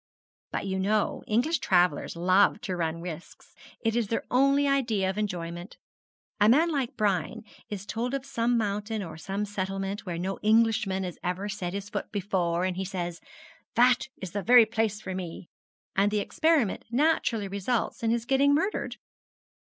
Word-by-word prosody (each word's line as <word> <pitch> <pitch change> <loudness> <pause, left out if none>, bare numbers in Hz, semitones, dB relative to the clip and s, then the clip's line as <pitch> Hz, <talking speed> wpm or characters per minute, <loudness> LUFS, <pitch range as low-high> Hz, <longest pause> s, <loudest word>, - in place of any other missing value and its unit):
'But - - -3
you 190 -1 -2
know 210 +2 +1
English 250 +10 +1
travellers 180 -2 +2
love 185 +5 +3
to 195 -6 -3
run 165 -1 -2
risks. 170 -1 -9 0.3
It 225 -1 0
is 235 -3 +1
their 225 - -1
only 275 +2 +4
idea 235 -8 +1
of 190 - -10
enjoyment. 175 -2 -4 0.6
A 210 +1 +5
man 320 +8 +4
like 270 -5 -2
Brian 195 -6 0 0.3
is 200 -2 -5
told 240 +5 -2
of 275 -1 -4
some 240 -3 +1
mountain 210 0 -2
or 165 - -7
some 195 +6 -3
settlement 195 0 -3
where 175 -3 -4
no 190 +3 -3
Englishman 215 -3 +2
has 180 -2 -6
ever 180 +3 -2
set 185 -3 -4
his 200 +1 -5
foot - - -4
before, 185 -4 0
and 185 -1 -2
he 190 - -1
says, 175 -3 -4 0.5
"That 245 +1 +4
is 185 -3 -6
the 205 - -2
very 240 +2 +7
place 220 -2 -1
for 190 - -6
me," 180 -1 -6 0.5
and 200 +1 +3
the 210 - -1
experiment 295 - +1
naturally 240 -5 +1
results 200 +6 -2
in 225 - +1
his 230 0 0
getting 275 +2 +4
murdered.' 385 +8 -1
205 Hz, 170 wpm, -28 LUFS, 185-235 Hz, 0.6 s, very